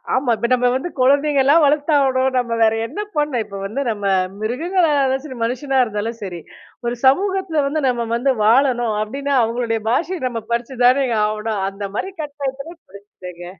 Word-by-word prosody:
ஆமா. 260 -1 +1
இப்ப 235 - -1
நம்ம 250 0 +2
வந்து 270 +7 -2
குழந்தைங்கலாம் 280 +3 +4
வளர்த்தாவணும். 280 -3 +2
நம்ம 240 -2 -1
வேற 220 -1 +4
என்ன 410 - -5 0.2
பண்ண? 295 -1 0
இப்ப 200 -1 -9
வந்து 220 +8 -3
நம்ம 205 -3 -3 0.3
மிருகங்களா 325 - 0
அதாச்சும் 265 0 0
சரி, 260 - -8
மனுஷனா 260 +3 -1
இருந்தாலும் 220 0 -4
சரி. 180 -3 -6 0.5
1 240 0 -1
சமூகத்துல 375 +2 +2
வந்து 300 +3 -1
நம்ம 240 -2 0
வந்து 260 +3 +1
வாழணும் 240 -1 +3
அப்பிடின்னா, 275 +6 -2
அவுங்களுடைய 230 0 -1
பாஷைய 335 +9 0
நம்ம 235 -2 -4
படிச்சு 235 +3 -2
தானே 265 +2 +4 0.2
ஆவணும். 215 -1 -2
அந்த 195 +1 -9
மாரி 380 - -3
கட்டாயத்தில 285 +2 -6
படிச்சிட்டேங்க. 185 -3 -11
255 Hz, 160 wpm, -19 LUFS, 225-285 Hz, 0.5 s, குழந்தைங்கலாம்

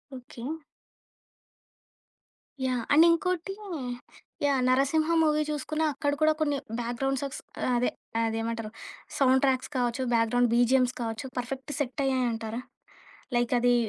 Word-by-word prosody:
Okay. 245 -2 -10 2.2
Yeah! 250 -2 0
And 315 +3 +8
ఇంకోటి 360 +2 0 0.9
yeah! 275 -2 +3
'Narasimha' 280 +5 +3
movie 305 0 +3
చూసుకున్న 305 +2 -2
అక్కడ 285 +1 0
కూడా 310 0 +5
కొన్ని 290 -2 +1 0.2
బ్యాక్గ్రౌండ్ 250 +3 -1
సాడ్స్ 275 -1 -5 0.3
ఆహ్, 250 - +2
అదే 245 - +2 0.3
అదేమంటారు 225 -1 -2 0.5
సౌండ్ 265 -1 +4
ట్రాక్స్ 260 +1 0
కావచ్చు, 245 +1 0
బ్యాక్గ్రౌండ్ 235 +1 +3
బీజీఎమ్స్ 250 +1 +3
కావచ్చు, 225 +3 -3
పర్ఫెక్ట్ 265 +3 -5
సెట్ 280 0 -2
అయ్యాయింటారా? 240 -3 -1 0.8
లైక్ 240 0 +1
అది. 245 0 +4
255 Hz, 115 wpm, -28 LUFS, 240-285 Hz, 2.2 s, And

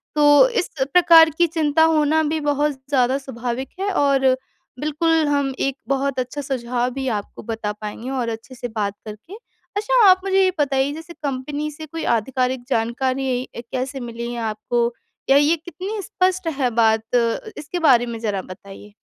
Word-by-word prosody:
तो 295 +11 +6
इस 465 -7 -1 0.2
प्रकार 330 -2 +7
की 345 - +4
चिंता 320 -1 +2
होना 315 -1 +3
भी 315 +1 -1
बहुत 290 0 +1 0.2
ज़्यादा 260 -1 +2
स्वाभाविक 255 -1 -5
है 395 +1 -1
और 275 -6 +2 0.5
बिल्कुल 315 +1 +1
हम 280 -2 0
एक 275 0 -1
बहुत 275 -1 0
अच्छा 255 +3 -3
सुझाव 250 -3 -2
भी 265 -1 -4
आपको 205 - -12
बता 220 -2 -3
पाएँगे 210 +4 -7
और 255 -3 -2
अच्छे 225 +3 -8
से 245 - -5
बात 210 -3 -3
करके। 215 - -10 0.4
अच्छा 475 +3 +3
आप 370 0 +5
मुझे 385 0 +3
ये 370 - +3
बताइए 275 -1 +1
जैसे 325 +2 -9
कंपनी 285 +2 -3
से 310 +2 -9
कोई 325 +1 -6
आधिकारिक 255 +2 -2
जानकारी 255 +2 -1
कैसे 255 +3 -4
मिली 235 0 -6
है 240 - -4
आपको 235 +2 -1 0.4
या 275 - +7
ये 295 +3 +4
कितनी 365 +6 -6
स्पष्ट 370 -2 -1
है 255 - +2
बात। 220 0 +3 0.5
इसके 305 +4 -5
बारे 255 -7 +5
में 230 -1 -5
ज़रा 205 -4 -2
बताइए? 195 +2 -12
270 Hz, 165 wpm, -21 LUFS, 240-315 Hz, 0.5 s, प्रकार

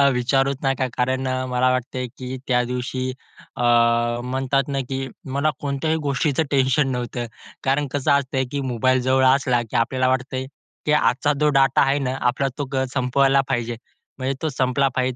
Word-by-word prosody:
विचारुचं 135 +2 +1
नका 130 -1 +1
कारण 130 +1 0 0.2
मला 125 +1 +2
वाटतंय, 125 0 -2
की 130 0 -5
त्या 125 -1 +2
दिवशी 125 +1 -3 0.5
अ, 125 - -3 0.6
म्हणतात 130 +2 0
ना, 140 -1 -2
की 135 0 -3 0.3
मला 150 +2 +2
कोणत्याही 145 +3 -1
गोष्टीचं 140 +2 +1
टेन्शन 135 +1 +3
नव्हतं. 120 -1 -3 0.4
कारण 140 +2 +1
कसं 140 -1 0
असतंय 135 -1 +1
की 140 -1 -2
मोबाईल 130 +2 +2
जवळ 130 +1 +3
असला 130 -2 +3
की - - -6
आपल्याला 130 +2 +1
वाटतंय, 130 0 -1 0.4
की 150 - +1
आजचा 145 0 +2
जो 150 0 +3
डाटा 135 0 +4
आहे 135 +1 +3
ना, 130 -1 -2
आपला 135 +2 -1
तो 145 - -2
ग 130 0 +1
संपवायला 135 +1 +3
पाहिजे. 120 0 -1 0.4
म्हणजे 130 +1 -1
तो 160 - 0
संपला 135 0 +1
पाहिजे. 130 -1 0
130 Hz, 165 wpm, -22 LUFS, 125-140 Hz, 0.6 s, डाटा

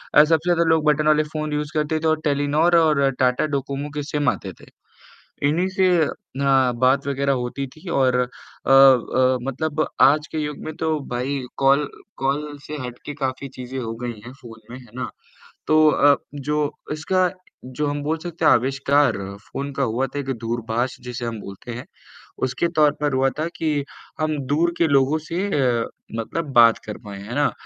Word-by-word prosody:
अ, 150 - +9
सबसे 160 +1 +1
ज़्यादा 170 0 +2
लोग 160 -1 +3
बटन 155 +1 0
वाले 155 0 +4
फोन 155 -1 -3
यूज़ 150 +2 -3
करते 155 +1 0
थे 160 - -1
और 155 0 +1
टेलीनॉर 150 +4 +2
और 150 -4 +3
टाटा 125 +3 +2
डोकोमो 140 +2 -4
के 145 - -2
सिम 145 -2 +2
आते - - -4
थे, - - -14 0.8
इन्हीं 175 +5 +1
से 190 0 +2 0.2
अ, 135 -2 0
बात 130 +3 +2
वगैरह 140 0 0
होती 130 +3 -4
थी 155 +7 -13
और 130 -4 +2
अ 125 - +1 0.4
अ 130 -1 +5
मतलब 145 +4 -1 0.2
आज 150 +2 +5
के 160 - -2
युग 150 -1 -3
में 155 - -5
तो 160 0 0 0.2
भाई 130 +3 -2 0.2
कॉल 140 +1 +3 0.3
कॉल 145 +2 -1
से 150 - -5
हट 125 0 -9
के 145 - -5
काफ़ी 135 -1 -3
चीज़ें 130 +1 -6
हो 115 -1 -4
गई 120 -3 -5
हैं 125 - -8
फोन 115 -2 -12
में, 125 - -8
है 120 -3 -16
ना? 130 - -4 0.6
तो 155 0 +5
अ, 145 -1 +5 0.2
जो 150 +1 -1 0.2
इसका 180 +4 +1 0.5
जो 150 - 0
हम 145 0 -2
बोल 160 +2 -1
सकते 170 0 -5
हैं - - +7
आविष्कार 135 0 +2 0.4
फोन 140 +1 -4
का 140 - 0
हुआ 125 +4 0
था 145 - -2
एक 135 -1 -3
दूरभाष 120 +2 -2
जिसे 125 0 -5
हम 115 -2 -4
बोलते 100 +5 -9
हैं, 120 +2 -6 0.6
उसके 170 +6 -1
तौर 150 -1 +5
पर 145 -2 0
हुआ 135 +1 +3
था 155 - 0
कि 150 -3 -1 0.4
हम 155 -1 0
दूर 170 +3 +2
के 170 - +4
लोगों 140 +2 +3
से 180 +4 -1
अ, 125 -8 +1 0.4
मतलब 150 +5 -4
बात 115 -2 +6
कर 105 - -6
पाएँ, 100 -1 -8
है 120 - -6
ना? 145 0 +2
140 Hz, 190 wpm, -22 LUFS, 130-155 Hz, 0.8 s, अ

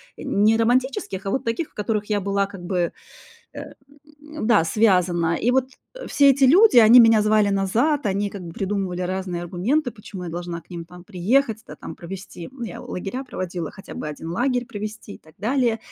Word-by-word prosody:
не 215 +2 +2
романтических, 230 -5 0
а 195 - -2
вот 265 +3 -1
таких, 230 +7 -2
в - - -35
которых 210 0 -2
я 205 -1 -1
была 200 +1 0
как 195 -2 -11
бы, 175 -2 -1 0.6
э, - - -8 0.6
м, 305 -5 -6
да, 210 -8 +4
связана. 175 -3 +2
И 245 - +1
вот, 260 0 +2 0.3
э, - - -9
все 280 -1 +5
эти 275 +1 0
люди, 360 - +6
они 235 +2 +8
меня 225 -2 +6
звали 215 -1 +3
назад, 220 +9 +1
они 200 +1 -1
как 195 -2 -8
бы 170 -1 -8
придумывали 190 -1 -3
разные 180 -1 -3
аргументы, 235 - -1
почему 200 -4 -9
я - - -5
должна 175 0 -5
к - - -29
ним 170 -1 -6
там 180 +1 -14
приехать, 220 +5 0
да - - -9
там, - - -9
провести. 180 -1 -9
Ну, 255 -2 -8
я 195 - -7
лагеря 200 +8 -5
проводила, 180 - -5
хотя 195 - -12
бы 150 - -5
один 150 +2 -7
лагерь 245 +3 0
провести 215 -2 -7
и - - -13
так 155 0 -21
далее. 235 0 +1
205 Hz, 200 wpm, -22 LUFS, 180-240 Hz, 0.6 s, они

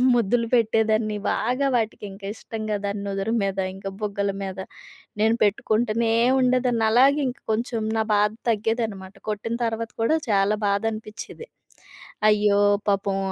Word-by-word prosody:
ముద్దులు 230 0 +1
పెట్టేదాన్ని 220 -2 +2
బాగా 255 +4 0
వాటికి. 225 -2 -3
ఇంకా 195 0 -9
ఇష్టంగా 215 -2 -4
దాని 200 0 -3
నుదురు 195 +3 -2
మీద, 195 -1 -2 0.2
ఇంకా 195 0 -6
బుగ్గల 200 -1 -1
మీద, 190 -1 -6 0.6
నేను 225 +2 +3
పెట్టుకుంటనే 220 +2 +1 0.3
ఉండేదాన్ని. 250 -3 +2
అలాగే 275 +5 +5
ఇంకా 250 - -9
కొంచెం 230 0 -2
నా 220 - +2
బాధ 210 0 +3 0.2
తగ్గేదనమాట. 215 -3 -2 0.2
కొట్టిన 220 +2 -3
తర్వాత 225 0 -3
కూడా 310 +8 +3
చాలా 200 +1 +2
బాధ 200 +1 +1
అనిపిచ్చేది. 220 - -9 0.8
అయ్యో! 210 -1 +4 0.3
పాపం 200 -1 +1
220 Hz, 130 wpm, -24 LUFS, 200-230 Hz, 0.8 s, అలాగే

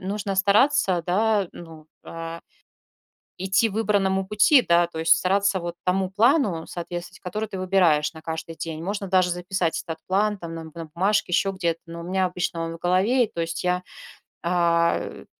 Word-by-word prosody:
нужно 200 0 -3
стараться, 200 -1 +3
да, 205 0 +2
ну, 160 -2 -12 0.2
а, 165 0 -7 1.0
идти 190 +4 +2
выбранному 195 -2 0
пути, 210 +7 +5
да, 170 -2 +3
то 165 - -10
есть 165 0 +5
стараться 195 +1 +1
вот 170 0 -5
тому 185 0 +1
плану 215 - +2
соответствовать, 175 +1 -7
который 210 +4 -4
ты 195 - -7
выбираешь 175 -6 +2
на 160 - -11
каждый 160 0 -5
день. 160 -1 -5
Можно 200 +2 -3
даже 185 -1 +3
записать 180 -1 -1
этот 160 -1 -6
план, 205 +2 +1
там, 165 -1 -7
на 165 - -6
на 165 +1 -8
бумажке, 190 +1 +1
еще 195 +2 +2
где-то, 170 -4 -2
но 170 0 -9
у - - -8
меня 185 +1 0
обычно 180 -2 -2
он 165 - -5
в 165 - -10
голове, 200 +8 +2
и 215 - -16
то - - -7
есть 165 0 -3
я, 180 0 0 0.6
а, 170 -1 +2
э. - - -8
180 Hz, 180 wpm, -24 LUFS, 170-200 Hz, 1.0 s, пути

